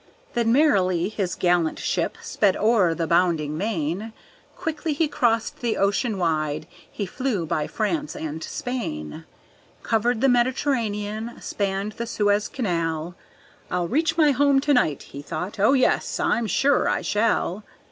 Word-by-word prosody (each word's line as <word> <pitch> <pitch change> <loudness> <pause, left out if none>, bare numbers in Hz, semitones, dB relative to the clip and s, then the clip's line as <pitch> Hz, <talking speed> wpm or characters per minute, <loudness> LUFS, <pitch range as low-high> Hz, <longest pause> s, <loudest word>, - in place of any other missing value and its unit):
Then 235 -3 +1
merrily 190 - +3
his 195 -4 -2
gallant 175 -2 +1
ship - - -1
sped 200 -3 +1
o'er 205 -7 +3
the 165 - -1
bounding 165 -3 +1
main, 195 +2 -2 0.4
Quickly 320 -2 -2
he 310 +2 +1
crossed 230 -5 0
the 235 -2 -1
ocean 200 +3 +1
wide, 155 -3 -1 0.3
he 205 - -3
flew 215 -3 -2
by 155 -2 -1
France 295 +8 -2
and 160 0 -5
Spain; 75 - -5 0.6
Covered 230 +1 +1
the 270 - +4
Mediterranean, 235 -4 0
spanned 200 +1 -2
the 235 +3 -5
Suez 205 -1 +1
Canal, 170 - -2 0.5
"I'll 180 -1 -1
reach 315 - +1
my 305 -3 +5
home 280 0 +4
to 290 +1 +2
night," 150 - +2
he 140 - -9
thought, 190 +8 -5
"oh, 210 +7 +5
yes, 260 -2 +1
I'm 230 -1 +1
sure 275 +6 +2
I - - 0
shall." 210 -2 0
210 Hz, 145 wpm, -24 LUFS, 175-245 Hz, 0.6 s, my